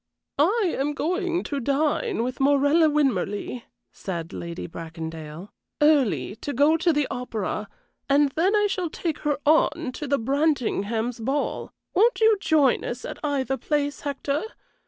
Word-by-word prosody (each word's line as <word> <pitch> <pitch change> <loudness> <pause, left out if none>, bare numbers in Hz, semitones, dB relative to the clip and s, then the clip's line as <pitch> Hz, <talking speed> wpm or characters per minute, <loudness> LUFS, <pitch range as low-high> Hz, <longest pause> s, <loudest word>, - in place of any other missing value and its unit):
"I 380 +4 +3
am 290 +2 0
going 355 +2 -1
to 285 - -3
dine 290 - 0
with 255 +1 -4
Morella 285 +3 +4
Winmarleigh," 245 -5 0 0.3
said 170 -2 -6
Lady 170 0 -6
Bracondale, 160 +1 -7 0.3
"early, 245 - +3
to 285 - -5
go 290 +5 +4
to 335 +1 +2
the 295 -2 +1
opera, 215 -4 -3 0.4
and 285 +1 +4
then 365 +8 +2
I 415 0 +3
shall 370 -4 -1
take 315 -1 -3
her 295 -1 0
on 315 -1 +3
to 295 +3 -6
the 280 +1 +2
Brantingham's 240 -4 0
ball. 270 +6 -2 0.2
Won't 460 +6 +3
you 445 -1 +5
join 310 -6 +3
us 245 +1 -5
at - - -7
either 270 -2 0
place, 290 +3 -1
Hector? 285 +1 -2
285 Hz, 145 wpm, -25 LUFS, 230-315 Hz, 0.4 s, you